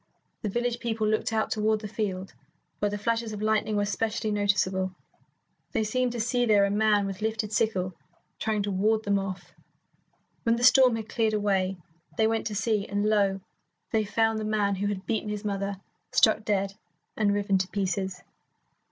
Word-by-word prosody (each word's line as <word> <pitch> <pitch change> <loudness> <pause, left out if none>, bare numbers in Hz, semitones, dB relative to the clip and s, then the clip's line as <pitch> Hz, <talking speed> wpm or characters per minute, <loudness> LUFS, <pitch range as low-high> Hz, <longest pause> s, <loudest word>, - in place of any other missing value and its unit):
The 215 - -2
village 240 +3 -1
people 225 -2 -1
looked 215 +1 0
out 220 -1 0
toward 215 0 +1
the 215 - -5
field, 195 -3 -3 0.5
where 205 - +1
the 205 - -3
flashes 230 +1 -1
of 210 - -6
lightning 215 0 +1
were 205 0 +2
specially 215 +1 -1
noticeable. 190 -2 +1 0.8
They 225 -4 +1
seemed 250 +3 0
to 240 - -4
see 240 +2 +1
there 205 -2 +5
a 200 - -1
man 210 -1 +3
with 195 0 -5
lifted 220 -1 -2
sickle 190 -4 0 0.5
trying 215 -2 0
to 200 - -2
ward 215 +3 +2
them 200 -1 +2
off. 195 -1 -6 0.9
When 230 0 +2
the 240 - -3
storm 255 -1 +7
had 220 -1 -5
cleared 220 -2 +1
away, 195 -2 +1 0.4
they 220 - +4
went 225 0 0
to 210 - -4
see, 210 -1 0
and 205 +1 -1
lo, 200 -2 +2 0.5
they 220 -1 +2
found 225 +1 +1
the - - -3
man 210 -2 +1
who 205 +2 -1
had 200 -1 -3
beaten 220 -2 -1
his 210 0 -4
mother 200 -1 -2 0.3
struck 220 0 +4
dead 195 -2 0 0.4
and 210 -2 +2
riven 200 -1 +1
to 185 - -1
pieces. 190 -1 -2
210 Hz, 185 wpm, -27 LUFS, 200-220 Hz, 0.9 s, storm